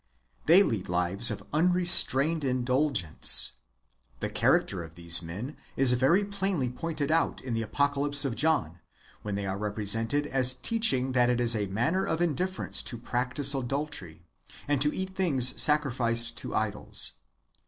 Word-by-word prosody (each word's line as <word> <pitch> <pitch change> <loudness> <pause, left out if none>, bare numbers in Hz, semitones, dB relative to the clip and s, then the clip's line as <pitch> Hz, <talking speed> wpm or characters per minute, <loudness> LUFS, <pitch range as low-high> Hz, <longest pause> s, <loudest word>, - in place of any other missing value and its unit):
They 175 +5 +6
lead 105 - -4
lives 90 +6 +1
of 110 - -6
unrestrained 165 -3 +4
indulgence. 130 - +2 0.7
The - - -5
character 95 -4 0
of 80 0 -14
these 85 0 +4
men 100 - -8 0.2
is 130 -2 +4
very 150 +11 +1
plainly 195 -10 -3
pointed 155 +2 -5
out 165 +1 -1
in 130 -2 -6
the 115 - -2
Apocalypse 145 +4 +1
of 125 -4 -3
John, 130 - -1 0.4
[when 105 -1 -6
they 100 0 -5
are 95 0 -5
represented] 110 +6 0
as 130 -3 +1
teaching 135 - 0
that 125 -1 +1
it 120 -1 -1
is 120 -1 +1
a 105 -2 -3
matter 120 - -2
of 160 - -3
indifference 175 +3 -2
to 120 - -2
practise 125 +4 0
adultery, 130 - -5 0.4
and 145 -2 -1
to 150 +1 +2
eat 190 +3 -6
things 140 -10 +2
sacrificed 120 -6 0
to - - -5
idols. 110 -1 -1
130 Hz, 150 wpm, -26 LUFS, 110-150 Hz, 0.7 s, They